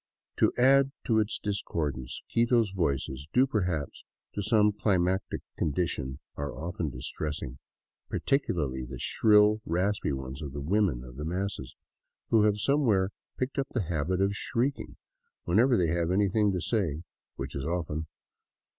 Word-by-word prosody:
To - - +4
add 135 +2 +5
to 110 -2 +3
its 110 0 0
discordance, 75 - -3
Quito's 115 -3 +3
voices, 70 -6 -1
due 130 +2 +5
perhaps 90 - -2 0.3
to 100 - -2
some 105 +1 +4
cli 105 -1 +1
matic 90 +2 0 0.2
condition, 70 -4 -1 0.2
are 70 -3 -4
often 85 +1 -3
distressing, 70 +1 -5 0.5
particularly 75 - 0
the 60 - -7
shrill, 105 0 +4
raspy 90 +1 0
ones 65 +1 -5
of 70 -3 -6
the 75 - -4
women 85 - +1
of 60 0 -11
the 75 - -4
masses, 90 -6 -3 0.6
who 110 -2 +5
have 105 -1 +3
somewhere 105 -5 +2 0.3
picked 130 +2 -2
up 135 - 0
the 115 - +1
habit 90 +3 0
of 100 +1 +2
shrieking 130 +6 -1 0.5
whenever 120 +7 +4
they 85 -3 +2
have 85 0 0
anything 100 +2 +3
to 90 -2 -2
say 85 -9 -1
— - - -65
which - - -6
is 70 - -3
often. 80 -1 -2
90 Hz, 150 wpm, -29 LUFS, 75-105 Hz, 0.6 s, add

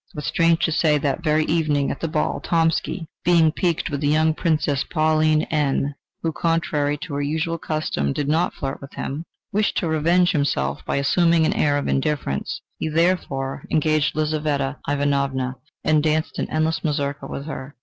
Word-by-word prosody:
But, 150 - -5
strange 165 +2 +2
to 160 - 0
say, 155 -1 +3
that 145 +3 -1
very 155 -1 +2
evening 150 -4 +1
at - - -5
the 165 - -2
ball, 155 -1 -1
Tomsky, 165 +1 0 0.2
being 170 -3 +4
piqued 170 0 -1
with 140 0 -2
the 145 - +1
young 155 +2 +3
Princess 155 -4 0
Pauline 155 -1 +2
N, 145 -2 +1 0.3
who, 165 - +1
contrary 155 -3 0
to 165 -5 -7
her 140 - -1
usual 160 +3 -1
custom, 155 - -1
did 145 - -2
not 160 +4 +1
flirt 135 -2 -4
with 140 - -11
him, 150 +5 -4 0.3
wished 210 +1 +1
to 175 - 0
revenge 170 +3 +3
himself 75 - 0
by - - -1
assuming 165 +4 +3
an - - +2
air 145 -1 +2
of 145 - -2
indifference: 135 - -1 0.2
he - - -1
therefore 150 -5 0
engaged 155 -1 +1
Lizaveta 150 -2 -1
Ivanovna 140 -3 0 0.3
and 155 -1 +3
danced 155 0 0
an - - -2
endless 155 +1 0
mazurka 140 -2 -2
with 140 - -6
her. 145 -2 -7
155 Hz, 175 wpm, -22 LUFS, 145-160 Hz, 0.3 s, being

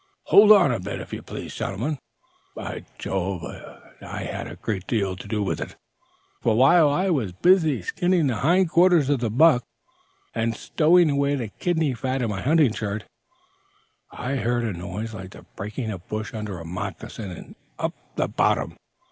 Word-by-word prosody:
"Hold 210 +1 +9
on 200 -10 +7
a 120 - -1
bit, 100 +2 -5
if - - -9
you - - -4
please, - - -7
gentlemen; 130 +9 -3 0.6
by - - -6
Jove, 95 -2 -2
it - - -11
had - - -5
a - - -8
great 100 -4 -4
deal 100 -5 0
to 95 - -10
do 105 0 -1
with 95 - -2
it. - - -6 0.7
For, 110 - +2
while 150 +5 +6
I 180 +6 +1
was 115 - 0
busy 160 - +3
skinning 175 - +1
the 125 -5 0
hind 170 - +3
quarters 170 -5 +5
of 140 - +2
the 115 -2 -1
buck, 125 +2 +5 0.7
and 115 -1 -1
stowing 165 0 +4
away 140 0 +1
the 120 -6 -3
kidney 160 - 0
fat 130 +2 -2
in 115 - -1
my 95 -2 -4
hunting 145 -2 +3
shirt, 105 -1 -3 1.1
I 135 +2 -3
heard 120 0 0
a 110 -3 -1
noise 100 +6 -5
like 95 -3 -8
the - - -13
breaking 110 +3 -4
of 95 -4 -8
brush 110 +3 -4
under 105 -4 -5
a 85 - -8
moccasin 90 +2 -6 0.2
up - - -2 0.2
'the - - 0
bottom.' - - +1
120 Hz, 175 wpm, -24 LUFS, 100-150 Hz, 1.1 s, Hold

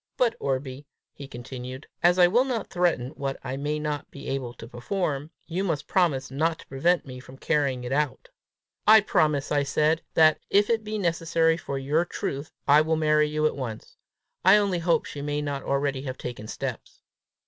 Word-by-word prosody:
But, 235 -2 +2
Orbie," 135 +1 -3 0.3
he 140 - -9
continued, 130 +1 -8 0.2
"as 175 +1 +4
I 180 - +7
will 225 +8 +4
not 245 -5 -3
threaten 170 -8 +1
what 135 -1 -4
I 130 - -4
may 145 +2 -2
not 150 -1 -3
be 140 - -10
able 135 -3 -3
to 115 - -10
perform, 140 - -3 0.2
you 175 +3 -2
must 160 -6 -1
promise 145 -9 +1
not 160 +4 0
to - - -14
prevent 170 +6 +1
me 130 -2 -8
from 130 +1 -13
carrying 140 -4 0
it 125 - -5
out." 145 0 -1 0.6
"I 220 0 +9
promise," 150 -7 +1
I 145 -1 +3
said, 150 +3 +1
"that, 155 -1 +5
if 205 +3 +3
it 225 -1 +1
be 215 0 -4
necessary 165 -3 +1
for 140 -4 -5
your 145 +5 +1
truth, 145 -3 -4 0.2
I 145 +1 +7
will 160 +1 +1
marry 150 -1 +3
you 155 0 0
at 155 - +1
once. 120 -6 -6 0.5
I 190 +3 +7
only 200 -4 +1
hope 170 0 +1
she 145 - -7
may 145 0 -2
not 145 -2 -3
already 140 0 -1
have 130 -2 -5
taken 120 -3 -7
steps!" - - -6
150 Hz, 190 wpm, -26 LUFS, 135-170 Hz, 0.6 s, I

